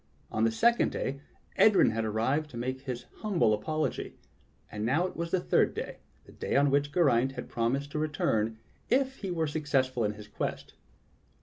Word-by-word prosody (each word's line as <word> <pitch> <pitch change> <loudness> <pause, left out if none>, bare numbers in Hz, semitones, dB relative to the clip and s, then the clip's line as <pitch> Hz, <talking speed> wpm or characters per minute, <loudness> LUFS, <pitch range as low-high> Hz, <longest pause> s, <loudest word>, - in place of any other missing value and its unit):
On 110 +1 +1
the 115 - +2
second 235 - +3
day 140 +1 -3 0.4
Edryn 210 - +6
had 115 +1 -1
arrived 115 +8 0
to 120 - -9
make 130 +2 -3
his 125 -3 -5
humble 175 - +2
apologj\ 155 +9 -2 0.6
And 105 0 -4
now 140 +10 +2
it 185 - -5
was 170 0 -3
the 185 - +1
third - - +2
day - - -5
— - - -35
the - - -15
day - - -3
on 140 0 +4
which 145 +1 +2
Geraint 135 -6 +3
had 125 - -6
promised 135 +5 -1
to 150 - -2
re 155 - +1
turn 110 -6 0 0.3
if 265 +1 +2
he 195 - -5
were 165 -3 0
successful 135 -5 0
in 105 0 0
his 105 0 -11
quest. - - -4
135 Hz, 195 wpm, -29 LUFS, 115-155 Hz, 0.6 s, Edryn